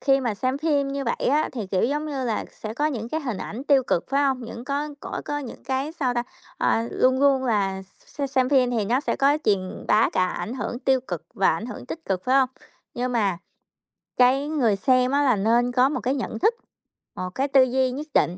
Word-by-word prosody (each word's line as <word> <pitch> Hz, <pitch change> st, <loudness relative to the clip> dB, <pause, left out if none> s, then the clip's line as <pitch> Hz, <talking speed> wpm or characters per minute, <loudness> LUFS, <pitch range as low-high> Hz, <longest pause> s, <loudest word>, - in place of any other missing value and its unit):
Khi 275 Hz, 0 st, +3 dB
mà 235 Hz, -5 st, -1 dB
xem 255 Hz, +6 st, -1 dB
phim 290 Hz, -3 st, +1 dB
như 275 Hz, 0 st, -3 dB
vậy 235 Hz, -, -1 dB
á 295 Hz, +4 st, +2 dB
thì, 230 Hz, -7 st, -4 dB
kiểu, 185 Hz, 0 st, 0 dB
giống 295 Hz, +5 st, -1 dB
như 275 Hz, -4 st, -3 dB
là, 225 Hz, -3 st, -1 dB
sẽ 215 Hz, 0 st, -7 dB
có 295 Hz, +4 st, +1 dB
những 235 Hz, -7 st, -3 dB
cái 315 Hz, +5 st, -2 dB
hình 245 Hz, -9 st, -3 dB
ảnh 240 Hz, +6 st, -6 dB
tiêu 280 Hz, -2 st, +4 dB
cực, 175 Hz, -8 st, 0 dB
phải 280 Hz, +1 st, +2 dB
hông? 265 Hz, -2 st, +1 dB
Những 235 Hz, +1 st, -8 dB
có 285 Hz, +2 st, -2 dB
có -, -, -5 dB
có 290 Hz, -, -2 dB
những 265 Hz, -5 st, -8 dB
cái, 270 Hz, +3 st, -2 dB
sao 270 Hz, -7 st, -1 dB
ta, 240 Hz, -, 0 dB, 0.4 s
ờ, 230 Hz, +1 st, +1 dB
luôn 260 Hz, +1 st, +2 dB
luôn 275 Hz, -2 st, +3 dB
là 195 Hz, -5 st, 0 dB, 0.3 s
x-xem 270 Hz, -3 st, 0 dB
phim 260 Hz, -3 st, +3 dB
thì 230 Hz, -4 st, 0 dB
nó 240 Hz, +6 st, +1 dB
sẽ -, -, -2 dB
có 285 Hz, +2 st, +3 dB
truyền 190 Hz, -3 st, -1 dB
bá 215 Hz, +2 st, +4 dB
cả 185 Hz, -, +2 dB
ảnh 220 Hz, +5 st, -4 dB
hưởng 245 Hz, -2 st, -4 dB
tiêu 265 Hz, 0 st, +2 dB
cực 175 Hz, -10 st, -6 dB
và 195 Hz, -, +3 dB
ảnh 210 Hz, +8 st, -5 dB
hưởng 245 Hz, +1 st, -8 dB
tích 325 Hz, +4 st, -7 dB
cực, 185 Hz, -1 st, -2 dB
phải 255 Hz, -, +2 dB
hông? 260 Hz, -2 st, +3 dB, 0.5 s
Nhưng 250 Hz, +1 st, -2 dB
mà, 200 Hz, -7 st, +1 dB, 0.8 s
cái 260 Hz, +3 st, +4 dB
người 245 Hz, -9 st, +2 dB
xem, 255 Hz, +4 st, +2 dB
á, 285 Hz, +1 st, +3 dB
là 255 Hz, -5 st, +4 dB
nên 235 Hz, +5 st, +2 dB
có 255 Hz, +2 st, +4 dB
một 295 Hz, -, -2 dB
cái 260 Hz, +2 st, 0 dB
nhận 235 Hz, -4 st, -4 dB
thức, 445 Hz, -, +3 dB, 0.6 s
một 185 Hz, -, -4 dB
cái 275 Hz, +2 st, 0 dB
tư 270 Hz, -1 st, +6 dB
duy 255 Hz, 0 st, +1 dB
nhất 290 Hz, +4 st, -6 dB
định 175 Hz, +2 st, +2 dB
255 Hz, 240 wpm, -24 LUFS, 230-275 Hz, 0.8 s, tư